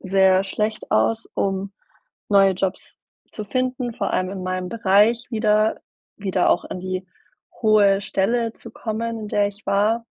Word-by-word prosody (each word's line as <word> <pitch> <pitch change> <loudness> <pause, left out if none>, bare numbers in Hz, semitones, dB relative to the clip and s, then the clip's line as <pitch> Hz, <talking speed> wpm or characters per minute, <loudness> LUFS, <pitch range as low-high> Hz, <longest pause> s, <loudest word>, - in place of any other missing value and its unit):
sehr 190 0 +3
schlecht 215 +2 -3
aus, 225 0 +1
um 195 0 -2 0.6
neue 195 -1 +5
Jobs 190 +1 -4 0.4
zu 215 - -6
finden, 255 +1 -2
vor - - -2
allem 185 0 0
in 190 -1 -6
meinem 185 0 -3
Bereich 220 +2 +3
wieder 215 -1 +2 0.4
wieder 190 -3 0
auch - - +1
an 185 - -6
die 185 0 -4 0.6
hohe 205 -3 +4
Stelle 225 +4 0
zu - - -13
kommen, 230 +1 -4
in 210 - -6
der 205 0 +2
ich 205 +1 -15
war. 215 +4 +1
205 Hz, 155 wpm, -22 LUFS, 190-225 Hz, 0.6 s, neue